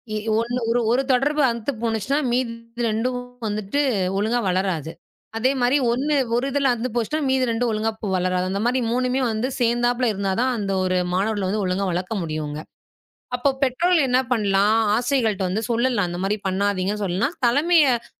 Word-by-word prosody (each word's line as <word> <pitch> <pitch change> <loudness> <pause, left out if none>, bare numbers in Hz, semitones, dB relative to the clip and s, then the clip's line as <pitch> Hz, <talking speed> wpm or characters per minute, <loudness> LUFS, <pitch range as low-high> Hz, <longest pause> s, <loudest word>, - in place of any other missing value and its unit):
இ - - 0 0.2
ஒண்ணு 240 +2 -2
ஒரு 240 - +2
1 250 +3 +3
தொடர்பு 285 +4 +2
அந்து 235 +3 -3
போணுச்சுனா 230 +4 0 0.2
மீதி 245 -1 0 0.4
2ம் 235 +4 -1 0.3
வந்துட்டு 210 +5 -2 0.4
ஒழுங்கா 220 +4 +1
வளராது. 180 -4 -1 0.5
அதே 245 +3 +2
மாரி 245 +3 +3
ஒண்ணு, 280 +5 0 0.2
1 245 +2 +1
இதுல 280 0 +2
அந்து 240 +2 -3
போச்சுனா, 240 +6 -1
மீதி 260 -1 +2
2ம் 230 +1 0
ஒழுங்கா 220 +1 0 0.2
வளராது. 185 0 0
அந்த 195 +1 -2
மாரி 250 +2 +2
3மே 255 +2 0
வந்து 220 +3 -1
சேந்தாப்புல 240 +1 +1
இருந்தாதான் 200 +6 0
அந்த 200 -2 -2
ஒரு 185 0 +1 0.2
மாணவர்களை 200 +1 0
ஒழுங்கா 185 +2 -1
வளக்க 180 +4 -3
முடியும்ங்க. 155 -2 -4 0.8
அப்போ, 245 +3 +1
பெற்றோர்கள் 310 +4 +2
என்ன 250 +1 +3
பண்ணலாம்? 205 -1 +3 0.2
ஆசிரியர்கள்ட்ட 235 -6 0
வந்து 200 +5 -2
சொல்லலாம். 235 -5 +1
அந்த 175 0 -5
மாரி 205 +2 0
பண்ணாதீங்கன்னு 200 +1 -1
சொல்லலாம். 195 - -1
தலைமையச் 280 -2 +3
230 Hz, 155 wpm, -22 LUFS, 195-255 Hz, 0.8 s, 1